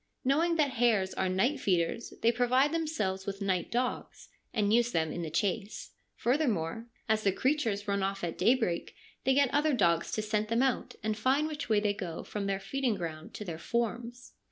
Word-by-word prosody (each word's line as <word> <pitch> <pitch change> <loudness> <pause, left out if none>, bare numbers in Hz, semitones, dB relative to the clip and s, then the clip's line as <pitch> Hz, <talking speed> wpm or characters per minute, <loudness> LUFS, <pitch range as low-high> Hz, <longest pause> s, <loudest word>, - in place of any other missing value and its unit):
Knowing 325 +6 +3
that 300 -4 +2
hares 225 -6 +2
are 190 - 0
night 245 +11 +1
feeders, 180 +1 0
they 230 - +6
provide 250 +4 +3
themselves 255 -13 -2
with 195 0 -3
night 190 -3 -1
dogs, 250 +1 -3 0.2
and 210 -2 +1
use 240 +1 +3
them 160 -4 0
in 175 - -4
the 165 - -3
chase. 200 +5 -2 0.2
Further 280 +5 +1
more, 210 +2 -2 0.2
as 220 -1 +2
the 200 - +3
creatures 225 -4 0
run 200 0 0
off 195 0 -2
at 170 - -2
daybreak, 220 -4 +1 0.3
they 265 0 +4
get 280 -2 +3
other 295 +1 +3
dogs 170 -7 +2
to 215 - -1
scent 215 0 0
them 230 +3 +2
out 265 -3 -1
and 215 0 0
find 260 +7 +2
which 300 -4 -5
way 215 -2 +4
they 205 -1 +1
go 180 -5 -5
from 205 -1 -4
their 195 -1 0
feeding 260 +2 -1
ground 160 -4 -6
to 210 - -6
their 165 -3 -5
forms. 235 +4 -3
215 Hz, 200 wpm, -30 LUFS, 195-255 Hz, 0.3 s, they